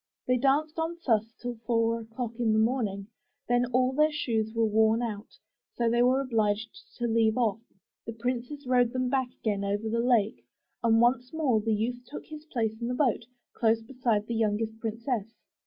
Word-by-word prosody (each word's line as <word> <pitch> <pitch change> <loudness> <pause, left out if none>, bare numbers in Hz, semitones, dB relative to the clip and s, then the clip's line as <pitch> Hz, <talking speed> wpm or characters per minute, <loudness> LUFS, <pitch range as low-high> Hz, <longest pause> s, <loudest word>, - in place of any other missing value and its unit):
They 250 0 +2
danced 295 +5 +1
on 325 +1 -2
thus 225 -2 +2
till 245 -1 -5
four 230 -1 +2
o'clock 225 +1 -5
in 225 -2 +2
the - - +2
morning; 220 -4 0 0.4
then 245 0 +2
all 255 +1 +2
their 305 +3 +3
shoes 225 -7 -1
were 230 0 +1
worn 220 +2 +3
out, 215 -2 -6 0.4
so 235 - +1
they 240 +1 +3
were 255 +2 +4
obliged 220 - 0 0.2
to 240 - -2
leave 225 -1 +2
off. 225 -3 +1 0.5
The 230 - -4
princes 250 +5 -4
rowed 245 -2 +3
them 255 -1 0
back 260 -1 0
again 205 -3 -1
over 205 +2 -1
the 230 +1 0
lake, 235 -2 +2 0.4
and 225 -1 +4
once 245 +1 +2
more 275 -9 +1
the 225 +1 -1
youth 240 +3 -2
took 295 - -8
his 305 -1 -10
place 230 -8 -1
in 235 - -2
the 250 - -1
boat, 245 -5 +1 0.3
close 225 -1 +2
beside 235 -4 -1
the 235 - -4
youngest 220 0 -1
princess. 225 -1 -3
235 Hz, 190 wpm, -28 LUFS, 220-255 Hz, 0.5 s, were